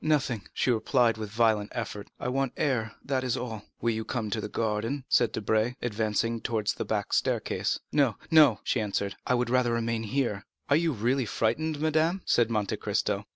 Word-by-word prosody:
"Nothing," 135 -8 0
she 130 - +1
replied 115 -1 +2
with 110 -1 -4
a - - -17
violent 110 -2 +2
effort. 105 -3 -5
"I - - -3
want 135 0 0
air, 115 -7 0
that 135 -2 0
is 125 -3 0
all." 110 -4 -5 0.2
"Will 115 - +2
you 110 0 -2
come 110 0 -3
into 110 +1 -2
the - - -5
garden?" 115 +5 -1
said 120 - +3
Debray, 110 +3 0
advancing 115 0 -1
towards 110 -2 0
the - - -4
back - - -2
staircase. - - 0
"No, 135 -7 +3 0.2
no," 150 -9 +6
she - - 0
answered, 100 -1 -2
"I 125 - +3
would 120 -1 0
rather 125 -2 +3
remain 115 -1 -1
here." 110 -3 -2 0.2
"Are - - +7
you 165 +1 +2
really 125 +1 0
frightened, 145 +9 0
madame?" 160 +4 +1
said 120 -1 +3
Monte 105 -3 -1
Cristo. - - -1
115 Hz, 195 wpm, -28 LUFS, 110-130 Hz, 0.2 s, Are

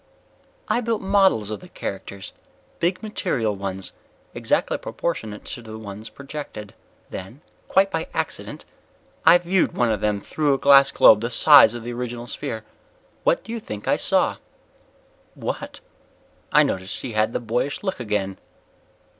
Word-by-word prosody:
"I 240 - +1
built 230 -3 -2
models 190 - +3
of 105 - -4
the 180 - -14
characters. 95 - -7 0.5
Big 180 +5 0
material 115 - -1
ones, 95 -1 -5 0.4
exactly - - 0
proportionate 110 -11 -4
to 120 - -6
the 110 -1 -9
ones 105 0 -8
projected. 140 -7 -8 0.4
Then 95 +10 -8 0.3
quite 195 +1 +3
by 160 0 -2
accident - - -4 0.6
I 175 - +9
viewed 175 +1 +1
one 120 -2 +1
of 105 -2 -1
them 105 -1 0
through 145 +6 0
a - - -2
glass 140 0 +6
globe 110 - +6
the 115 - -2
size 125 -2 +7
of 120 - -6
the 120 +1 -5
original 120 0 -5
sphere. 110 -2 -5 0.6
What - - +2
do 225 - -9
you 230 - -3
think 105 - -8
I - - +4
saw?" - - +2 1.0
"What?" - - -5 0.7
I - - +6
noticed 95 +1 -3
he 125 - -4
had 110 +1 +1
the - - -2
boyish 120 - -2
look 190 -6 -2
again. 105 -4 -2
120 Hz, 155 wpm, -23 LUFS, 105-165 Hz, 1.0 s, I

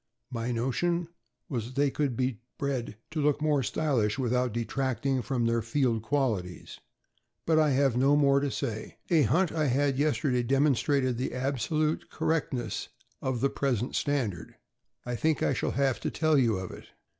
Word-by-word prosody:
My 115 0 -2
notion 165 +9 0 0.4
was 120 -6 -3
that 130 - -11
they 140 0 +2
could 135 -5 -1
be 130 -3 -1 0.2
bred 130 -6 -3
to 155 -1 -1
look 145 0 +2
more 150 -2 +2
stylish 130 -5 0
without 125 -1 +1
detracting 130 +3 -1
from 120 -1 -1
their 115 0 +2
field 125 -5 0
qualities; 110 -9 -2 0.7
but 160 -1 +4
I 155 -1 +4
have 135 -2 +2
no 135 +3 +4
more 140 -1 +4
to 140 0 -1
say. 115 -5 -4
A 165 -3 +5
hunt 165 - +2
I 155 -2 0
had 135 +1 +1
yesterday 145 -4 +1
demonstrated 135 -1 +2
the 130 - -2
absolute 140 +4 -1
correctness 130 -9 -2 0.3
of 130 -3 -2
the 140 - +3
present 125 -3 -1
standard. 120 - -1 0.5
I 120 0 -2
think 155 +4 +1
I - - +2
shall - - -1
have 135 -2 +2
to - - -2
tell 155 -1 +2
you 115 -7 +3
of 95 -1 -5
it. - - -11
135 Hz, 170 wpm, -29 LUFS, 120-145 Hz, 0.7 s, A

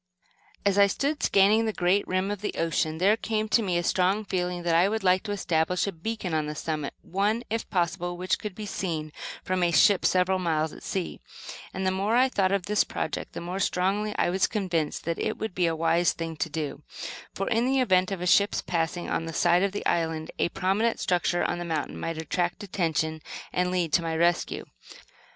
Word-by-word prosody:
As 200 0 +3
I 200 - +7
stood 285 +8 -1
scanning 205 +3 +4
the - - +1
great 185 +2 +1
rim 185 +2 0
of 205 -1 -4
the 210 - -3
ocean, 160 -1 0
there 195 +5 +4
came 220 -1 -2
to 230 - +4
me 185 -5 0
a 175 - 0
strong 190 +4 +1
feeling 180 -2 -2
that 170 -1 +1
I 175 +4 +4
would 220 -1 -2
like 185 0 +4
to 205 - -3
establish 180 -3 0
a 200 - -2
beacon 190 +1 -4
on 155 -1 0
the 150 - -4
summit, 155 -2 -3
one, 205 +6 0
if 225 0 -2
possible, 175 -1 -1
which 185 +1 0
could 210 -3 -6
be 215 - -6
seen 165 -6 -3 0.3
from 185 0 -1
a 175 - +3
ship 185 +3 +5
several 185 +1 +2
miles 160 -3 0
at - - -12
sea; 190 -3 -3 0.5
and 190 0 -3
the 185 - +3
more 200 +4 0
I 255 +2 +5
thought 195 -6 +1
of 195 -3 0
this 210 0 +3
project 155 - -4
the - - -5
more 180 +3 -4
strongly 200 +3 0
was 190 +2 +2
I - - -19
convinced 175 -7 -1
that 170 0 -2
it - - -1
would 220 -3 -4
be 180 -1 +1
a 165 - 0
wise 165 +2 +2
thing 165 -1 -5
to 165 - -1
do; 150 -1 -4 0.5
for, 195 - -2
in 230 +2 +2
the 270 0 +2
event 185 -7 +3
of 190 -3 -3
a - - -2
ship's 200 +3 +3
passing 170 0 -2
on 165 - -1
this 165 -1 -4
side 175 0 +4
of 200 0 +1
the 205 - -5
island, 160 -1 0
a - - +2
prominent 195 +6 0
structure 175 -1 +1
on 175 - -1
the - - -3
mountain 160 -3 -3
might 165 -1 -3
attract 175 +5 -2
attention 160 -4 -1 0.3
and 180 0 +1
lead 180 -4 -1
to 175 - +5
my 165 -1 -2
rescue. 170 +1 +1
180 Hz, 220 wpm, -27 LUFS, 165-200 Hz, 0.5 s, I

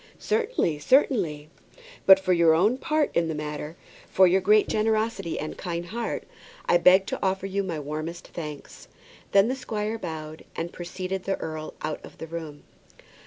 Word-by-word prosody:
"Certainly, 435 - 0
certainly." 160 - +2 0.6
"But 190 0 +10
for 185 -1 +1
your 170 -2 +5
own 210 +10 +2
part 310 -1 0
in 170 -1 +2
the 160 - -3
matter, 150 +1 -5 0.3
for 190 - +5
your 185 +2 +4
great 210 +3 +4
generosity 215 -4 0
and 155 - -5
kind 170 -2 -3
heart, 230 +7 -3 0.4
I 175 - +4
beg 185 +2 +6
to - - -4
offer 190 0 0
you 195 +1 -1
my 175 -5 -3
warmest 155 +4 -5
thanks." 150 -4 -8 0.4
Then 195 +2 +5
the 255 - -1
squire 220 -3 -3
bowed 155 -3 -6
low, - - -18
and 170 +1 -4
preceded 185 +2 -5
the 195 - 0
earl 155 -1 -6
out 155 0 -3
of - - -13
the - - -6
room. 160 -3 -7
180 Hz, 170 wpm, -26 LUFS, 160-210 Hz, 0.6 s, But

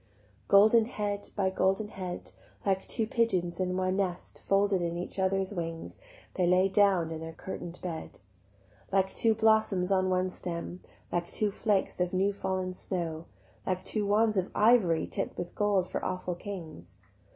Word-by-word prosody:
Golden 215 +3 +6
head 205 -3 -3
by 190 -2 +1
golden 190 +3 +1
head, 185 -3 -6 0.3
Like 195 -1 0
two 225 - 0
pigeons 190 -7 0
in 185 0 0
one 185 0 0
nest 185 -3 -3
Folded 195 -1 +2
in 170 0 -2
each 180 +2 -5
other's 190 +1 +1
wings, 165 -3 -5 0.3
They 180 -2 +1
lay 185 +2 +4
down 190 -5 +3
in 160 0 -5
their 160 0 -6
curtain'd 175 0 -7
bed: 165 -3 -6 0.7
Like 190 0 +2
two 225 -1 +2
blossoms 220 -4 +3
on 185 -1 +3
one 185 0 +1
stem, 175 0 -5 0.3
Like 175 0 -1
two 210 -1 +1
flakes 200 -3 0
of 180 0 0
new 195 +2 +2
fall'n 185 -2 -2
snow, 170 -3 -4 0.4
Like 185 -1 -2
two 210 -2 0
wands 215 +1 +3
of 185 0 0
ivory 210 -7 +4
Tipp'd - - -4
with 175 - -5
gold 200 -3 +1
for - - -4
awful 185 -1 -2
kings. 175 -4 -8
190 Hz, 160 wpm, -29 LUFS, 180-205 Hz, 0.7 s, Golden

